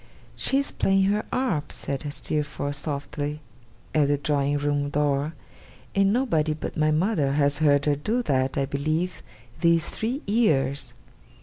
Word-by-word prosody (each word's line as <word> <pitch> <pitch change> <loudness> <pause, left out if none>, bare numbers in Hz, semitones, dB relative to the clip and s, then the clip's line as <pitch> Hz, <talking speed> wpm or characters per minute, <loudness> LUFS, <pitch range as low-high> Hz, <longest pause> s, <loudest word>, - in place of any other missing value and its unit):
'She 270 - +3
is 280 - +1
playing 195 0 +2
her 205 +2 +1
harp,' 185 - -1
said 140 +1 -4
Steerforth, 145 0 -3
softly, 145 0 -4 0.5
at 150 -2 +3
the 145 0 +2
drawing 145 0 0
room 145 0 0
door, 145 +1 0 0.6
'and 195 0 +3
nobody 165 - +1
but - - -6
my 155 0 +2
mother 155 -3 +1
has 145 0 +2
heard 145 -2 +3
her 145 -1 +3
do 220 - -1
that, 130 - 0
I 140 - +2
believe, 155 +6 -2 0.4
these 170 -1 +3
three 245 +6 -3
years. 150 - +1
150 Hz, 145 wpm, -25 LUFS, 145-185 Hz, 0.6 s, She